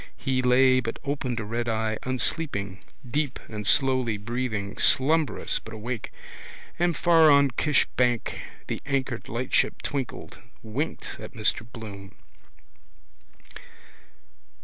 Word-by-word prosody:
He 130 -1 0
lay 130 +1 +5
but 115 -2 -3
opened 140 -4 -2
a 110 - -4
red 120 +2 -2
eye 110 -1 -1
unsleeping, 125 - -1 0.3
deep 145 +1 -1
and 105 -2 -5
slowly 130 -4 +3
breathing, 110 -2 -3
slumberous 155 +3 +3
but 110 0 -10
awake. 115 +2 -5 0.7
And 175 -2 +2
far 165 -2 +6
on 140 -2 +5
Kish 150 +3 +2
bank 120 -2 +1 0.2
the - - -4
anchored 135 -4 -2
lightship 125 +3 0
twinkled, 135 -4 -4 0.2
winked 125 +9 -4
at - - -9
Mr 115 +1 -1
Bloom. 100 -4 -9
125 Hz, 115 wpm, -26 LUFS, 110-140 Hz, 0.7 s, far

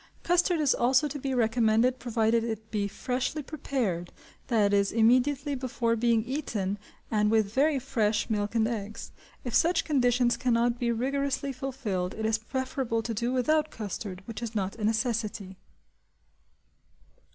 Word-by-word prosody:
Custard 350 -1 +2
is 290 -3 +3
also 260 +5 +3
to 290 0 -5
be 270 0 -3
recommended 230 +1 +2
provided 230 -1 +1
it 220 -1 -5
be 205 -2 0
freshly 255 +8 -3
prepared, 250 - -3 0.4
that 210 -4 +2
is 200 -1 +3
immediately 255 +5 +3
before 250 -3 -1
being 230 -1 +2
eaten, 215 -8 -2 0.3
and 210 -1 +2
with 215 -2 +2
very 285 +3 +3
fresh 220 -5 0
milk 210 0 -2
and 220 -1 +3
eggs: 215 -2 -5 0.3
if 245 - -5
such 335 0 +3
conditions 245 -4 +2
cannot 240 -1 +1
be 240 -1 +1
rigorously 275 +3 -1
fulfilled, 235 -9 -3
it 220 - -3
is 220 0 +1
preferable 260 -1 -2
to 230 - -3
do 235 +3 -1
without 305 +5 +2
custard, 200 -3 -6
which 230 -2 -7
is 230 -1 -5
not 195 -2 -1
a 220 - -6
necessity. 220 -3 -1
235 Hz, 150 wpm, -28 LUFS, 220-265 Hz, 0.4 s, is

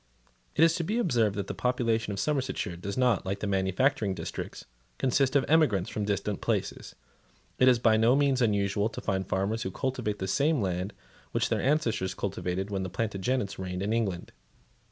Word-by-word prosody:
It 160 - +5
is 165 0 +6
to 170 - -1
be 210 +8 -1
observed 120 - +2
that 100 -2 -2
the - - -4
population 115 -4 0
of 100 - -4
Somersetshire 130 - -1
does 100 +5 -5
not, 125 -5 +3
like 100 +1 -2
that 105 - -4
of 100 - -1
the - - +2
manufacturing 95 +2 +1
districts, - - -6 0.3
consist 135 +1 +1
of 140 - +4
emigrants 135 - +3
from 105 - -2
distant 100 0 -2
places. - - -2 0.6
It 130 - +5
is 125 -2 +6
by 115 -1 +4
no 115 +3 +4
means 140 -2 +2
unusual 100 -1 +1
to - - -7
find 95 0 -2
farmers 100 +4 -1
who 95 - -2
cultivate 120 -1 -2
the 95 - -3
same 140 +10 +2
land 95 -1 -2 0.4
which - - +1
their - - 0
ancestors 115 - 0
cultivated 95 0 -3
when 95 -1 -1
the 95 - -3
Plantagenets 105 +2 -2
reigned 90 0 -3
in 105 +2 0
England. 100 -7 -2
105 Hz, 195 wpm, -28 LUFS, 95-130 Hz, 0.6 s, is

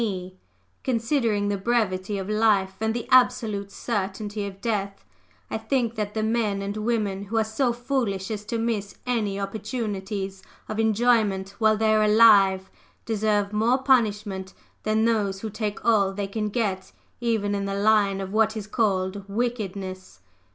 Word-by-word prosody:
_ 185 -5 -3 0.5
Considering 230 -4 +1
the 200 -1 -1
brevity 200 -3 0
of 190 -1 -4
life 210 -3 +2
and 220 0 +1
the 240 - -4
absolute 225 -6 +3
certainty 205 -1 -3
of 195 -1 -9
death, 200 -3 -3 0.5
I - - -2
think 245 -5 0
that 210 -2 -4
the 215 - 0
men 215 -3 0
and 200 +1 -4
women 210 -3 -1
who 225 +3 -3
are 220 - +4
so 230 +4 0
foolish 235 -6 -2
as 210 -1 -4
to 230 - -2
miss 225 -3 -2
any 215 -5 -1
opportunities 200 -2 -4 0.3
of 215 - -4
enjoyment 220 -3 +2
while 220 -1 +4
they 220 0 +3
are 215 - +4
alive 205 -3 +5 0.3
deserve 210 -2 0
more 225 +4 +3
punishment 210 -7 +1 0.3
than 215 +1 +1
those 205 -4 0
who 220 - -4
take 210 0 -4
all 205 -4 +4
they 200 +1 -3
can 210 +2 -3
get, 200 -4 -2 0.3
even 220 -4 0
in 200 0 -1
the 195 0 -2
line 200 -1 +3
of 190 +1 -6
what 220 0 +2
is 210 - -5
called 200 -2 0
wickedness. 200 - -4
210 Hz, 160 wpm, -25 LUFS, 195-225 Hz, 0.5 s, alive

